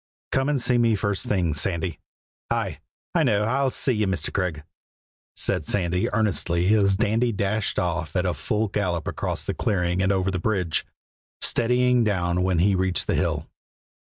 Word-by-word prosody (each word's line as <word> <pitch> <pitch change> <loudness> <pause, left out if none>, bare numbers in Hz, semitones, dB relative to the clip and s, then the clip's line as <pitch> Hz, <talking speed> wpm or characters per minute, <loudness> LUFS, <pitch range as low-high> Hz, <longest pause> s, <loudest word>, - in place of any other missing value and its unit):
"Come 135 +2 +1
and 145 -2 +1
see 125 0 +2
me 115 -2 +3
first 100 -1 -2
thing, 90 -6 +1
Sandy." 85 +2 -1 0.5
"Aye! - - -2 0.3
I 170 - +3
know; 105 -8 +2
I'll 130 +5 +1
see 130 - 0
ye, 105 -2 0
Mr. 95 -4 -2
Craig," 90 -6 -2 0.7
said - - +1
Sandy 90 +1 0
earnestly 95 -3 +1
as 100 -3 +3
Dandy 115 +3 +1
dashed 100 +1 -1
off 85 -1 -2
at 90 0 +1
a 90 - +1
full 105 +9 -1
gallop 90 -5 -2
across - - -2
the - - -1
clearing 90 -2 0
and 95 0 +2
over 95 0 +1
the 90 - -2
bridge, 90 -4 -1 0.5
steadying 125 +1 +2
down 90 -4 0
when 90 -1 +1
he 95 +4 +3
reached 95 -1 +1
the - - 0
hill. - - -1
95 Hz, 170 wpm, -24 LUFS, 90-110 Hz, 0.7 s, me